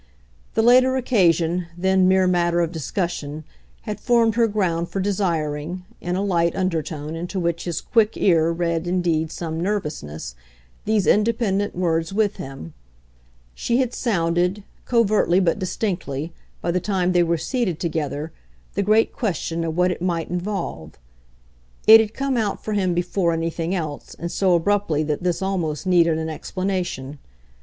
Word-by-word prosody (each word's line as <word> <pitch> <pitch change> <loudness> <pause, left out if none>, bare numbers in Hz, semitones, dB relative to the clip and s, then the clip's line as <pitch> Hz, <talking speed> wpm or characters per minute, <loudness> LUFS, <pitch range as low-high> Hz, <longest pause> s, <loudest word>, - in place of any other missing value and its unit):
The 225 - +3
later 255 +2 +5
occasion, 175 - +2
then 190 +1 +3
mere 190 0 +4
matter 175 -1 +2
of 170 -1 0
discussion, 155 -1 -3 0.4
had 210 -2 -5
formed 230 -1 +3
her 230 0 +3
ground 175 -5 -1
for 195 - -3
desiring 175 -3 -2
in 175 +1 -3
a 195 - 0
light 170 -4 +1
undertone 160 -4 -2
into 175 +3 -4
which 170 -1 -1
his 175 -2 -2
quick 225 -2 +2
ear 165 -4 +3
read 170 0 -1
indeed 170 -3 0
some 165 -1 -4
nervousness 150 - -3 0.5
these 215 -2 +2
independent 210 -2 +1
words 165 -2 0
with 205 0 0
him: 135 - -8 0.8
she 235 - 0
had 255 -2 0
sounded, 180 -2 0 0.2
covertly 215 -6 +3
but 180 +1 +1
distinctly, 175 -6 -3 0.3
by 170 - 0
the 180 - +1
time 185 -1 0
they 175 -1 +4
were 170 0 +1
seated 195 - -2
together, 155 -2 -3 0.4
the 200 - 0
great 215 +3 +3
question 170 - -2
of 165 0 -3
what 180 0 +3
it 180 - -5
might 170 -2 -1
involve. 175 - -4 0.9
It 220 +1 +10
had 220 0 -1
come 275 -2 -1
out 210 -3 -1
for 215 - -3
him 185 -4 +1
before 175 0 0
anything 165 +2 -2
else, 155 -5 -5
and 170 +1 -5
so 185 -3 +2
abruptly 170 -3 +1
that 150 -1 -2
this 180 +1 -1
almost 175 -6 -2
needed 170 -3 +4
an 160 0 -3
explanation. 175 -4 -3
175 Hz, 155 wpm, -22 LUFS, 165-200 Hz, 0.9 s, It